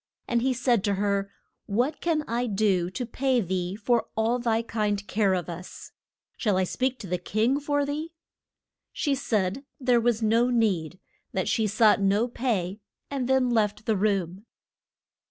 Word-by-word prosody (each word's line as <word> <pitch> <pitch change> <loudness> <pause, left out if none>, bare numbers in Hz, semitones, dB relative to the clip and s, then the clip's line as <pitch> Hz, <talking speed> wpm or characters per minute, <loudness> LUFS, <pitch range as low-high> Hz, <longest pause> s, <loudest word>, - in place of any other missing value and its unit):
And 235 -1 +1
he 260 +2 +2
said 240 -4 +1
to 200 -1 +1
her, 200 0 0 0.4
What 245 +9 0
can 320 -3 +1
I 240 +2 -1
do 195 -4 +1
to 245 +7 -4
pay 255 +2 +1
thee 185 -2 -2
for 230 +2 +1
all 230 +3 +1
thy 230 -1 +1
kind 210 -3 -1
care 200 -3 +2
of 175 -3 -3
us? 175 +1 -9 0.5
Shall 205 -5 +1
I 190 - +3
speak 260 +7 -1
to 200 - -7
the 180 0 -1
king 220 +9 +1
for 290 0 0
thee? 305 +3 -4 0.8
She 290 - 0
said 220 -2 -1 0.2
there 250 -3 +3
was 230 -1 +1
no 230 +3 +3
need, 190 -9 +1 0.4
that - - -1
she 220 -2 +1
sought 210 0 +4
no 200 +4 +2
pay, 215 -6 -2 0.3
and 265 -3 -2
then 260 -2 +3
left 215 -2 0
the 220 - +2
room. 195 0 -1
220 Hz, 170 wpm, -26 LUFS, 195-245 Hz, 0.8 s, sought